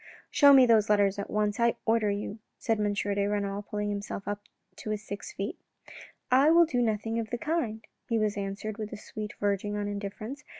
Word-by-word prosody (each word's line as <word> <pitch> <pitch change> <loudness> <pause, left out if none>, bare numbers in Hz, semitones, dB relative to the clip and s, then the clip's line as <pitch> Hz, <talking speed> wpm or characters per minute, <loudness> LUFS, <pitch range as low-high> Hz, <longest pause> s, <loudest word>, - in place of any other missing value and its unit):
" - - -23
Show 285 -2 +7
me 265 -2 +8
those 225 -3 +4
letters 205 -1 +3
at 200 - -4
once, 210 +1 0
I 235 0 +3
order 225 -2 +2
you," 205 +1 -3 0.3
and 225 -2 +2
M. 205 -1 +1
de 200 0 0
Renal 205 -1 -1
pulled 210 0 -4
himself 205 -1 -4
up 205 0 -3 0.4
to - - -7
his 215 0 -2
six 205 - -7
feet. - - -5 0.4
" - - -13 0.3
I 270 +4 +6
will 340 +1 +7
do 250 -6 0
nothing 225 0 0
of 220 -2 -4
the 240 - -2
kind," 235 -7 -2 0.2
he 230 - +2
was 215 -1 +1
answered 200 +2 -4
with 215 -1 -4
a - - -6
sweetness 210 0 -7
verging 205 0 0
on 205 0 -2
indifference. 205 +7 -5
210 Hz, 215 wpm, -29 LUFS, 205-230 Hz, 0.4 s, me